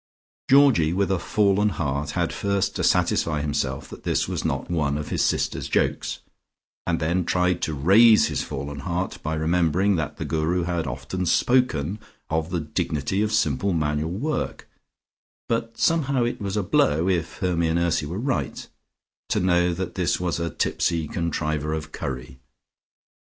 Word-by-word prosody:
Georgie 130 - +5
with 95 +1 +1
a 95 - +1
fallen 105 +2 +2
heart 70 -5 -2
had - - 0
first 100 -1 -1
to - - -2
satisfy 75 -3 +2
himself 70 -2 -2
that - - -11
this - - 0
was - - -3
not 70 - -2
one 75 -4 0
of 75 - -5
his - - 0
sisters' - - -1
jokes, - - 0 0.7
and 85 -1 +1
then 85 +3 0
tried 90 +1 +1
to 80 - -1
raise 105 +10 +6
his - - -1
fallen 70 +1 -5
heart 90 +6 -3
by 80 +1 -2
remembering 85 +4 +2
that 75 -3 -3
the 80 - -4
Guru 80 +4 0
had 85 -3 -2
often 70 +8 -4
spoken 105 - +2 0.3
of 80 +1 0
the 90 -1 -1
dignity 75 +4 -2
of 110 0 0
simple 100 -2 +1
manual 75 -1 0
work, 130 - -3 0.8
but 115 0 -2
somehow 140 -6 +2
it 120 -2 -2
was 100 0 -2
a 105 - +1
blow, 80 -1 +2
if 85 -4 -1
Hermy 85 -2 0
and 80 +1 +1
Ursy 85 -3 +1
were 85 +5 -4
right, 105 - -2 0.6
to - - +1
know 90 -1 +3
that 90 +1 -4
this 90 -4 0
was 90 -1 -1
a 85 0 -1
tipsy 80 0 -1
contriver 75 -3 -2
of 80 0 -6
curry. 65 -3 -6
85 Hz, 165 wpm, -24 LUFS, 75-95 Hz, 0.8 s, raise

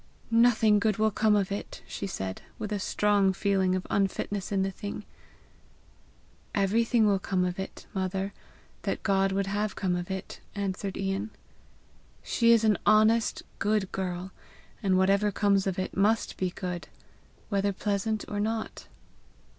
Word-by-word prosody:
"Nothing 230 -2 +5
good 215 -2 +1
will 220 0 +2
come 210 +1 +3
of 200 -1 +1
it!" 200 - -5
she 200 - -4
said, 95 - -4 0.2
with 215 -1 -5
a 205 - -1
strong 200 0 +2
feeling 190 -1 +1
of 185 - -3
unfitness 195 0 -1
in 195 -1 +2
the 195 - -1
thing. 205 +1 -6 1.5
"Everything 220 +3 +3
will 200 -2 +3
come 185 -1 0
of 180 +1 -3
it, 190 - -6
mother, 190 +1 -2 0.5
that - - -3
God 195 -1 +2
would 195 +1 0
have 205 +1 -1
come 185 -3 0
of 175 +1 -4
it," 190 -1 -5 0.2
answered 195 -1 -3
Ian. 195 +2 -2 0.9
"She 230 -1 +3
is 230 -1 +5
an 215 -2 +3
honest, 215 +2 +4 0.2
good 210 -2 +1
girl, 185 0 -3 0.5
and 190 -3 +2
whatever 200 +2 +3
comes 200 -1 +2
of 190 - -1
it 185 - -3
must 210 +3 +2
be 185 - -1
good, 180 -1 -5 0.6
whether 200 0 +1
pleasant 205 +2 -1
or 205 - -3
not." 220 +1 -3
200 Hz, 155 wpm, -28 LUFS, 190-210 Hz, 1.5 s, Nothing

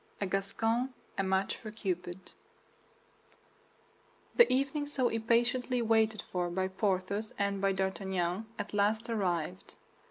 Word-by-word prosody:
A 200 - 0
GASCON 225 +6 0 0.2
A - - +1
MATCH 190 0 +1
FOR 220 - -8
CUPID 180 -4 -4 2.0
The 475 - +7
evening 275 +3 +1
so 260 -4 +1
impatiently 240 +2 +1
waited 220 -1 +2
for 175 -1 0
by 190 +2 -1
Porthos 195 +2 -1
and 200 -1 0
by 195 0 +3
D'Artagnan 190 0 -1
at - - -5
last 215 +3 +1
arrived. 180 -4 -2
200 Hz, 120 wpm, -32 LUFS, 190-230 Hz, 2.0 s, The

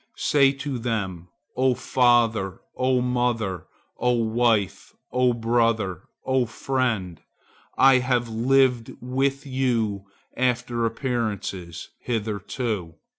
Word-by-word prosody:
Say 140 -2 +4
to 135 -2 -4
them, 100 -7 -3 0.3
'O 130 0 +2
father, 115 -7 +2 0.2
O 130 0 +2
mother, 120 -8 -1 0.3
O 125 0 +2
wife, 115 -4 0 0.2
O 125 0 +3
brother, 115 -5 0 0.2
O 130 -2 +1
friend, 115 - -2 0.6
I 135 -1 +6
have 125 -1 0
lived 125 +1 +2
with 135 +3 -1
you 115 -7 -1 0.3
after 120 -2 0
appearances 110 - -4
hitherto. 105 -4 -3
120 Hz, 95 wpm, -24 LUFS, 110-130 Hz, 0.6 s, I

